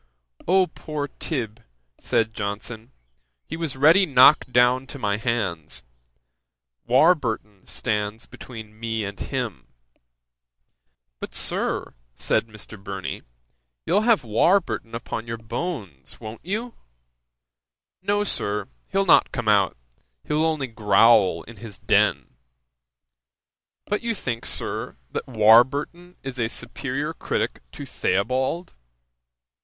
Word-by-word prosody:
"O 185 +2 +5
poor 150 -3 -5
Tib.! 115 -7 -3 0.4
(said 110 -1 0
Johnson) 110 +3 -5 0.5
he - - -6
was 160 -5 -4
ready 165 +8 +6
knocked 130 -1 +6
down 125 +2 +4
to 140 - -7
my 105 -5 0
hands; 105 -9 -2 1.0
Warburton 120 - +2
stands 105 0 -2
between 110 -3 -11
me 115 -1 -2
and 100 0 -7
him." 120 - -4 1.5
"But, - - -7
Sir, - - 0 0.2
(said 115 - +1
Mr. 105 -1 -12
Burney,) 95 -1 -5 0.6
you'll 205 - +3
have 225 - +3
Warburton 115 - +1
upon 115 0 -5
your 115 0 -4
bones, 115 - -5
won't 110 +2 -9
you?" 220 +7 -3 1.3
"No, 205 +2 +1
Sir; 105 - -2 0.2
he'll 195 0 +1
not 180 - +5
come 125 -3 -4
out: 100 - +3 0.5
he'll 150 +1 0
only 155 -4 0
growl 110 -5 +4
in 115 -1 -13
his 105 -3 -9
den." - - +2 1.6
"But 210 - -1
you 230 -1 -1
think, 120 - -4
Sir, - - -3 0.2
that - - -4
Warburton 130 +10 +4
is 135 -1 -6
a 115 - +1
superiour - - -4
critick - - -2
to - - -7
Theobald?" 130 - -1
120 Hz, 115 wpm, -24 LUFS, 105-155 Hz, 1.6 s, ready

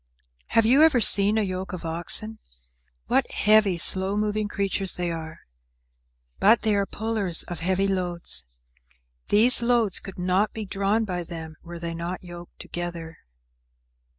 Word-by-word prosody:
Have 225 - +1
you 260 +6 +4
ever 315 -6 +4
seen 205 -1 +3
a 220 - +1
yoke 185 0 -5
of 180 - -7
oxen? 175 +7 +1 0.7
What - - 0
heavy, 210 -3 +3
slow 190 +3 +5
moving 210 0 -2
creatures 195 -2 -1
they 175 -1 -3
are! 160 -1 -8 1.0
But 220 +4 +3
they 215 -2 +1
are 200 -1 -1
pullers 210 -6 -1
of 175 - -8
heavy 190 +3 -1
loads. 175 - -1 0.8
These 235 +4 +5
loads 235 -5 0
could 195 - -12
not 185 +3 -1
be 220 -1 -6
drawn 200 +3 -1
by 180 -3 -4
them 160 -2 -9
were 175 0 -10
they 170 0 -6
not 170 +2 -6
yoked 175 -1 -12
together. 170 -2 -7
190 Hz, 150 wpm, -23 LUFS, 175-215 Hz, 1.0 s, slow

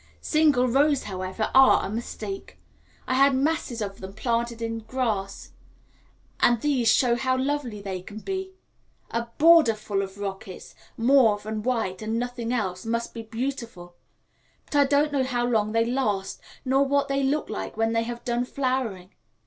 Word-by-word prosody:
Single 300 -5 +3
rows, 280 +3 +3
however, 190 +2 -4
are 265 0 +6
a - - -4
mistake; 215 -3 -6 0.5
I - - 0
had 275 +1 +4
masses 265 -5 -1
of 195 -1 -6
them 190 +1 -8
planted 235 +1 -1
in 225 0 -3
the - - -14
grass, 220 -6 -3 0.9
and 240 -1 +4
these 265 -3 +1
show 240 +1 +3
how 255 +1 0
lovely 260 -6 -2
they 190 -2 -4
can 205 +3 -10
be. 380 - -5 0.6
A 235 0 -2
border 320 -7 +6
full 205 -2 -2
of 195 0 -6
rockets, 195 -2 -7 0.2
mauve 230 -4 +4
and 215 -1 -4
white, 225 -7 -1
and 220 +1 -2
nothing 245 -1 -3
else, 190 -7 -2
must 230 +1 -2
be 230 - -6
beautiful; 225 -6 -5 0.7
but - - -7
I 285 -1 +5
don't 290 +2 +2
know 275 -2 +1
how 245 -2 -1
long 215 -3 +1
they 230 +1 +2
last 225 -6 -1 0.2
nor 265 +2 +3
what 280 0 +1
they 275 0 0
look 280 +3 0
like 215 - -5
when 225 0 +1
they 230 - +2
have 235 +1 -6
done 240 0 0
flowering. 250 -8 -2
235 Hz, 170 wpm, -25 LUFS, 215-265 Hz, 0.9 s, are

